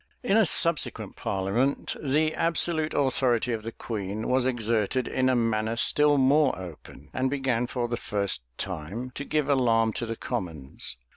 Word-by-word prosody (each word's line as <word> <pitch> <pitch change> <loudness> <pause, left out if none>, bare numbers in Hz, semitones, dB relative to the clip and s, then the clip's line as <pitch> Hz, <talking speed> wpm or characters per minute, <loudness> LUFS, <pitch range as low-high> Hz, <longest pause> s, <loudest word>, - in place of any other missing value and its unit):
In 225 -5 +2
a 220 -4 +5
subsequent 170 -2 +1
parliament, 100 +8 -1
the 155 +3 +2
absolute 165 -1 0
authority 125 -3 +2
of 110 - -3
the 115 +2 -6
queen 105 -2 -5
was 130 0 +2
exerted 115 0 0
in 130 0 +1
a 130 - +3
manner 115 -1 0
still 150 +4 +4
more 140 +1 +3
open; 90 -5 -11
and 130 0 0
began 130 -3 0
for 120 -1 -2
the 120 0 -2
first 100 - -1 0.2
time 95 +8 -5
to 140 - -6
give 150 0 -1
alarm 115 -5 +3
to 120 - -3
the 115 - -3
commons. 80 - -5
120 Hz, 160 wpm, -27 LUFS, 110-140 Hz, 0.2 s, a